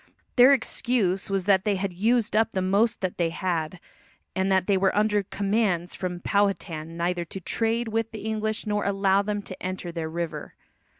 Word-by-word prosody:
Their 250 Hz, +2 st, +8 dB
excuse 230 Hz, -7 st, 0 dB
was 195 Hz, -2 st, -1 dB
that 195 Hz, -2 st, +4 dB
they 210 Hz, -2 st, +1 dB
had 190 Hz, -1 st, -2 dB
used 225 Hz, +4 st, +1 dB
up 225 Hz, +1 st, +2 dB
the 190 Hz, -, 0 dB
most 205 Hz, +4 st, +2 dB
that 185 Hz, -2 st, -3 dB
they 170 Hz, -1 st, +2 dB
had, 170 Hz, -1 st, -2 dB, 0.6 s
and 190 Hz, +1 st, +1 dB
that 190 Hz, -1 st, +3 dB
they 200 Hz, -, +2 dB
were 190 Hz, 0 st, +2 dB
under 210 Hz, -1 st, +3 dB
commands 195 Hz, -3 st, 0 dB
from 180 Hz, -2 st, -4 dB
Powhatan 170 Hz, -6 st, -1 dB
neither 175 Hz, +1 st, 0 dB
to 190 Hz, -, -7 dB
trade 225 Hz, +5 st, -1 dB
with 225 Hz, 0 st, -1 dB
the 220 Hz, -2 st, -8 dB
English 220 Hz, 0 st, -2 dB
nor 210 Hz, -1 st, 0 dB
to -, -, +1 dB
allow 195 Hz, 0 st, +3 dB
them 205 Hz, 0 st, -3 dB
to 185 Hz, -, -10 dB
enter 185 Hz, -1 st, -4 dB
their 165 Hz, -2 st, -4 dB
river. 170 Hz, 0 st, -5 dB
195 Hz, 190 wpm, -26 LUFS, 180-215 Hz, 0.6 s, Their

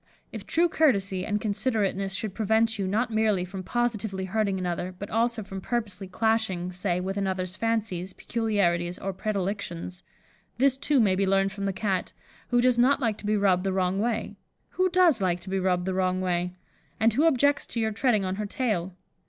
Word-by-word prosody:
If -, -, -8 dB
true 340 Hz, +2 st, +3 dB
courtesy 200 Hz, -, +1 dB
and 210 Hz, 0 st, 0 dB
considerateness 200 Hz, -3 st, -1 dB
should 210 Hz, 0 st, -3 dB
prevent 220 Hz, +1 st, +1 dB
you 195 Hz, -, -1 dB
not 225 Hz, +5 st, 0 dB
merely 215 Hz, -4 st, +1 dB
from 190 Hz, +1 st, -7 dB
positively 215 Hz, -3 st, -2 dB
hurting 200 Hz, 0 st, 0 dB
another, 180 Hz, 0 st, -3 dB
but 200 Hz, -, -7 dB
also 230 Hz, 0 st, +1 dB
from 195 Hz, -1 st, -7 dB
purposely 210 Hz, -4 st, -3 dB
clashing, 190 Hz, -3 st, 0 dB
say, 180 Hz, -1 st, -1 dB
with 190 Hz, +2 st, -3 dB
another's 185 Hz, -2 st, -2 dB
fancies, 215 Hz, -5 st, -1 dB
peculiarities, 185 Hz, -7 st, 0 dB
or 195 Hz, 0 st, -4 dB
predilections, 190 Hz, -3 st, -3 dB, 0.6 s
this 265 Hz, +1 st, +4 dB
too, 280 Hz, +1 st, +2 dB
may 205 Hz, -5 st, +4 dB
be 195 Hz, +1 st, +1 dB
learned 195 Hz, 0 st, +2 dB
from 200 Hz, -1 st, -5 dB
the 195 Hz, -, +1 dB
Cat, 190 Hz, -1 st, -2 dB, 0.3 s
who 245 Hz, 0 st, +2 dB
does 250 Hz, -1 st, +3 dB
not 265 Hz, +4 st, +4 dB
like 225 Hz, -5 st, -1 dB
to 210 Hz, -, -6 dB
be 210 Hz, 0 st, +2 dB
rubbed 190 Hz, -3 st, +3 dB
the 195 Hz, -1 st, 0 dB
wrong 185 Hz, 0 st, 0 dB
way 225 Hz, 0 st, -2 dB, 0.3 s
(who 370 Hz, 0 st, +1 dB
does 350 Hz, -, +4 dB
like 180 Hz, -2 st, +1 dB
to 190 Hz, -, -8 dB
be 195 Hz, -, +1 dB
rubbed 180 Hz, -1 st, +1 dB
the 190 Hz, -, -1 dB
wrong 185 Hz, 0 st, +1 dB
way?), 180 Hz, -1 st, -1 dB, 0.4 s
and 225 Hz, +1 st, +3 dB
who 295 Hz, +8 st, +3 dB
objects 285 Hz, -1 st, +2 dB
to 235 Hz, -, -4 dB
your 220 Hz, -1 st, +1 dB
treading 215 Hz, -2 st, +1 dB
on 185 Hz, +1 st, -2 dB
her 210 Hz, -1 st, -3 dB
tail. 195 Hz, -7 st, -2 dB
200 Hz, 195 wpm, -27 LUFS, 185-225 Hz, 0.6 s, this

